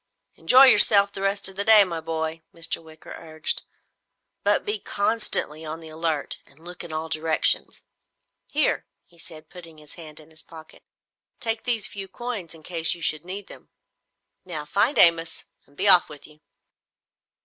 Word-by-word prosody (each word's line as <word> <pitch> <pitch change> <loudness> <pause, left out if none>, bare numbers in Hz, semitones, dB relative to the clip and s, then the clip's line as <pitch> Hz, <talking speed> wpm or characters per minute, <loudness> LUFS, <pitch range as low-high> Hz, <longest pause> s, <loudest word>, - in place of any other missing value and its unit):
"Enjoy 260 +2 +5
yourself 200 -6 +6
the 195 - -8
rest 195 0 0
of 190 - -7
the 200 - -2
day, 215 -1 +8
my 170 -4 -5
boy," 160 0 -5
Mr. 165 0 -2
Wicker 160 -1 -14
urged. 155 -1 -5 0.8
"But - - 0
be 420 0 -3
constantly 200 -7 -2
on 160 +1 -7
the 160 -1 -12
alert 155 -2 -4
and 140 - -20
look 180 0 -8
in 170 - -10
all 155 +1 -5
directions. 160 0 -1 0.6
Here," 300 +1 -1 0.2
he 170 -2 -23
said 155 -1 -13
putting 165 -3 -14
his 150 -1 -14
hand 155 -1 -12
in 155 +1 -18
his 160 - -11
pocket, 160 -1 -15 0.6
"take 225 -1 -3
these 235 -4 0
few 195 -1 -7
coins 205 -5 -7
in 160 - -17
case 165 0 -2
you 170 - -11
should 155 0 -1
need 195 +2 -7
them. - - -15 0.7
Now 160 -5 -7
find 220 - 0
Amos, 165 -1 +4 0.2
and 140 - -27
be 200 - -1
off 180 -3 +8
with 150 -2 -13
you!" 150 0 -18
165 Hz, 170 wpm, -23 LUFS, 160-200 Hz, 0.8 s, day